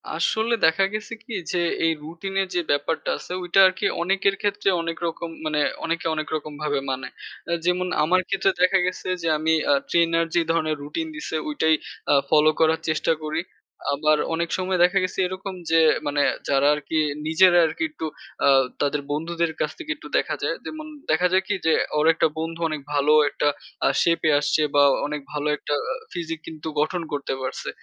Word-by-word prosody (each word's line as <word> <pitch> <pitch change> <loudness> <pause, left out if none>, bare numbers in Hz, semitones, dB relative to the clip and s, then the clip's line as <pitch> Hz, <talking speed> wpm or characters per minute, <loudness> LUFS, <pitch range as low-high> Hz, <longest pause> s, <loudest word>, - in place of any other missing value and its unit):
আসলে 220 +7 +1
দেখা 160 +4 +3
গেছে 215 +1 -5
কি 235 - -9 0.2
যে 180 - 0 0.3
এই 165 - +4
রুটিন 170 +5 -7
এর 190 - -2
যে 175 - +2
ব্যাপারটা 145 +3 -1
আছে - - -11
ওইটা 180 +2 +2
আরকি 185 0 -2 0.2
অনেকের 195 +2 +1
ক্ষেত্রে 205 -1 0
অনেক 165 0 -4
রকম 165 0 -5 0.2
মানে 155 -1 0 0.3
অনেকে 165 +1 -2
অনেক 155 0 -3
রকম 150 -1 -5
ভাবে 145 -2 0
মানে। 130 0 -4 0.4
আ - - -1
যেমন 180 +1 +1 0.2
আমার 185 +4 +3
ক্ষেত্রে 195 0 +2
দেখা 185 +1 +4
গেছে 185 - -4
যে 165 - -2
আমি 160 +1 +1 0.2
আ - - +6 0.2
ট্রেনার 165 0 +3
যে 170 - +4
ধরণের 155 -2 0
রুটিন 320 - -4
দিছে 305 - -5
ঐটাই 160 - +2 0.4
আ - - +6 0.2
ফলো 155 0 +5
করার 160 0 +3
চেষ্টা 155 +1 +1
করি। 155 +1 -2 0.5
আবার 155 +1 +2 0.2
অনেক 170 +1 -1
সময় 185 -1 -1
দেখা 180 +2 +3
গেছে 185 - -3
এরকম 190 +1 -6 0.2
যে 165 - +5 0.3
মানে 145 0 +1 0.3
যারা 140 0 +3
আরকি 150 +2 -4 0.3
নিজেরা 175 +3 +5
আরকি 160 0 -3
একটু 160 - -6 0.4
আ - - +5 0.3
তাদের 145 0 0
বন্ধুদের 165 +2 -1
কাছ 155 - 0
থেকে 320 -2 -5
একটু - - -12
দেখা - - 0
যায়। - - 0
যেমন 310 0 -6 0.3
দেখা 170 +3 +3
যায় 190 +1 +3
কি 205 - 0
যে 160 - +4 0.2
ওর 150 - +3
অনেকটা 165 0 +4
বন্ধু 165 +1 -4
অনেক 155 -2 -4
ভালো 145 +1 +3 0.2
একটা 150 - -1 0.4
আ - - +4
শেপ 170 0 +2
এ - - +5
আসছে 145 +1 +1
বা 145 - +6 0.2
অনেক 150 0 -4
ভালো 150 0 -2
একটা 145 - -2 0.4
ফিজিক 165 -2 -4
কিন্তু 160 -1 -8
গঠন 170 +4 0
করতে 145 -2 -2
পারছে। 130 - -4
165 Hz, 190 wpm, -24 LUFS, 155-185 Hz, 0.5 s, আ